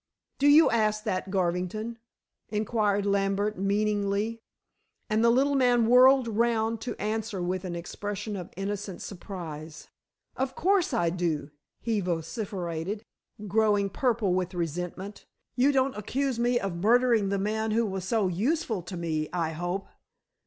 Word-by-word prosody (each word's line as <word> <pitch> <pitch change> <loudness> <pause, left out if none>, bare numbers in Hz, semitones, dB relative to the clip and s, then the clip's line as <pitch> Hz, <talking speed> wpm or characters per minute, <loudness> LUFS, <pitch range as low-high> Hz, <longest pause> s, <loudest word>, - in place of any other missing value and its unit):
"Do 280 - +4
you 300 +3 +7
ask 215 -2 +1
that, 190 -3 -2
Garvington?" 190 +5 -1 0.5
inquired 210 -1 0
Lambert 200 +1 0
meaningly, 205 +2 0 0.7
and 215 +1 +3
the 235 - +6
little 270 +4 +3
man 245 -3 +4
whirled 255 +2 +6
round 225 0 +1
to 245 - -5
answer 215 -1 -2
with 180 +1 -2
an 175 -2 -4
expression 205 +4 -5
of 180 -3 -6
innocent 195 -1 -4
surprise. 165 -5 -8 0.5
"Of 265 0 -2
course 380 -1 +2
I 175 -10 +1
do," 165 -5 -2 0.3
he 225 -3 0
vociferated, 180 +1 -3 0.4
growing 205 -1 +2
purple 230 -7 +1
with 185 0 -1
resentment. 180 +4 -4 0.3
"You 260 +3 +4
don't 265 -1 +1
accuse 255 +4 -2
me 240 +1 +2
of 195 -5 -3
murdering 230 +1 +3
the 200 - 0
man 215 +3 -1
who 225 +2 +2
was 190 -3 -3
so 210 +1 +1
useful 220 - 0
to 175 +1 -7
me, 160 -2 -2
I 170 -3 -1
hope?" 175 +4 -3
205 Hz, 140 wpm, -28 LUFS, 185-230 Hz, 0.7 s, you